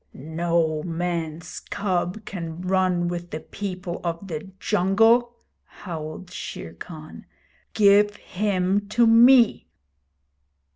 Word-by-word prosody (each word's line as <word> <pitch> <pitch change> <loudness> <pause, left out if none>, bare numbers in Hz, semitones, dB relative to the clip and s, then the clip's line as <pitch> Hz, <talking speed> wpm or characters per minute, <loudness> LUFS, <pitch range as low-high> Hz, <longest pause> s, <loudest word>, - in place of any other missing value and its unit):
'No 160 +1 -1
man's 165 -1 -4
cub 185 +1 -2
can 165 -4 -6
run 185 -1 +1
with 175 0 -4
the 155 - -5
people 185 -1 -6
of 170 +2 -4
the 165 +4 -5
jungle,' 225 +8 +3 0.3
howled 165 0 -8
Shere 80 - -7
Khan. 155 - -11 0.5
'Give 205 0 +5
him 200 0 -1
to 235 +2 +3
me!' 235 +1 +6
180 Hz, 100 wpm, -24 LUFS, 165-205 Hz, 0.5 s, me